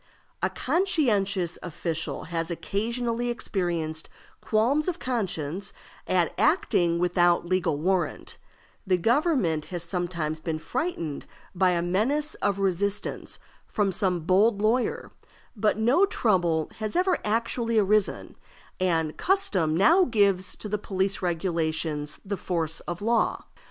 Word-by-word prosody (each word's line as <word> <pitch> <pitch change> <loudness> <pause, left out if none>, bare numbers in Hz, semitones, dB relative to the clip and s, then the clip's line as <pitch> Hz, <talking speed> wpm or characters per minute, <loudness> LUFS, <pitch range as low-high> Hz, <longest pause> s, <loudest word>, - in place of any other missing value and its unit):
A - - +1
conscientious 220 - +1
official 165 -1 -4
has 165 0 -3
occasionally 235 +6 -2
experienced 170 -8 -2 0.3
qualms 250 +9 +1
of 360 -2 -1
conscience 195 - -2 0.3
at - - +1
acting 170 -1 +2
without 175 0 +2
legal 170 -4 0
warrant; 180 +4 -1 0.5
the 185 -1 +3
government 225 - +1
has 175 -2 -5
sometimes 170 -3 -2
been 160 0 -3
frightened 170 - -3 0.3
by 185 0 +3
a 170 -1 0
menace 255 - 0
of 200 -1 +1
resistance 195 +1 -1 0.3
from 205 -2 0
some 180 -2 0
bold 200 +6 +3
lawyer, 225 +4 0 0.4
but 210 0 +1
no 255 - +4
trouble 175 - +1
has 215 -1 -1
ever 365 0 +2
actually 230 +1 0
arisen, 210 0 +1 0.4
and 165 -4 0
custom 195 - +2
now 335 - +5
gives 200 - +2
to - - -6
the 210 0 -2
police 195 -1 -1
regulations 160 -4 -1
the 200 0 -3
force 165 -4 -1
of 175 +3 -5
law. 230 +1 +1
190 Hz, 120 wpm, -26 LUFS, 170-230 Hz, 0.5 s, now